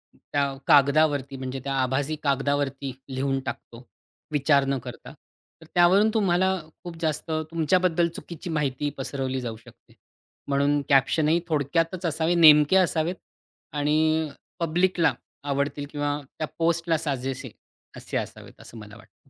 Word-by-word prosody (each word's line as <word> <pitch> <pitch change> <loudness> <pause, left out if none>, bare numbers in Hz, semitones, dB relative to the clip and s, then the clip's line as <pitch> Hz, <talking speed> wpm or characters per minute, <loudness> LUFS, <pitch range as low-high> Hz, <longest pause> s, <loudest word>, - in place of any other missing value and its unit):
त्या 145 - -2 0.2
कागदावरती 140 -1 +4
म्हणजे 130 0 -5
त्या 140 0 -3
आभासी 135 +4 0
कागदावरती 140 -1 -1 0.2
लिहून 135 +1 -1
टाकतो. 120 -1 -7 0.5
विचार 140 -1 +3
न 135 0 0
करता. - - -9 0.5
तर - - -13
त्यावरून 185 +5 +5
तुम्हाला 190 -3 +2 0.3
खूप 175 -1 -7
जास्त 160 0 -2 0.2
तुमच्याबद्दल 170 +1 +2
चुकीची 170 +1 -8
माहिती 145 -2 -1
पसरवली 130 -1 -3
जाऊ 115 -3 -5
शकते. 115 - -19 0.5
म्हणून 140 +1 +2
कॅप्शन 140 +3 +3
ही 165 +2 +3
थोडक्यातच 165 +4 0
असावे, 165 +1 +1
नेमके 150 0 +7
असावेत 175 -1 +1 0.6
आणि 155 +2 +1 0.3
पब्लिकला 170 +1 +2 0.3
आवडतील 140 0 -2
किंवा 145 0 -2 0.2
त्या 155 - -2
पोस्टला 165 0 +1
साजेसे 135 -4 -4 0.5
असे - - -4
असावेत - - -7
असं 115 - -12
मला 105 -1 -11
वाटतं. 135 - -22
150 Hz, 130 wpm, -25 LUFS, 135-165 Hz, 0.6 s, नेमके